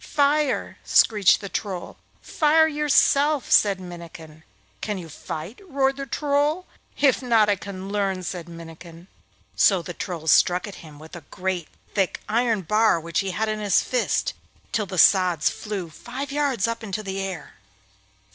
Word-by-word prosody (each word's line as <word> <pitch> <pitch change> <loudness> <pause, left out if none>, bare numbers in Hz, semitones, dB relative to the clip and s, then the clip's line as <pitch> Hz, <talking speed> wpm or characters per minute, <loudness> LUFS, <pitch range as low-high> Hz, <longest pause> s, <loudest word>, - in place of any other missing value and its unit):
'Fire!' 290 -1 +1
screeched 210 -4 +4
the 200 - -6
Troll. 190 -3 -5 0.3
'Fire 315 +1 +3
yourself!' 295 -1 +2
said 200 -3 +4
Minnikin. 170 -3 -11 0.4
'Can 210 - -3
you 175 -3 -8
fight?' 160 - -8
roared 270 -1 +1
the 275 0 -5
Troll. 295 +6 0 0.3
'If 275 -2 +3
not, 230 -4 +3
I 205 - +3
can 195 -1 -8
learn,' 195 -2 -1
said 175 -1 -6
Minnikin. 165 0 -11 0.5
So 190 -4 +4
the 175 - -7
Troll 170 -2 -6
struck 175 +4 +3
at 205 - -10
him 155 -3 -13
with 155 +3 -12
a 175 - -8
great 180 -3 -3 0.3
thick 195 -3 0
iron 225 -2 +1
bar 210 0 +3
which 165 +1 -2
he 195 - -1
had 215 +4 -1
in 215 0 -2
his 205 -3 +2
fist, 250 -2 -1 0.4
till 215 -2 -1
the 185 - -6
sods 180 -3 +4
flew 195 -6 -6
five 260 - -7
yards 275 -7 0
up 230 0 -3
into 215 0 -4
the 195 -1 -4
air. 185 -7 -7
200 Hz, 160 wpm, -24 LUFS, 175-250 Hz, 0.5 s, screeched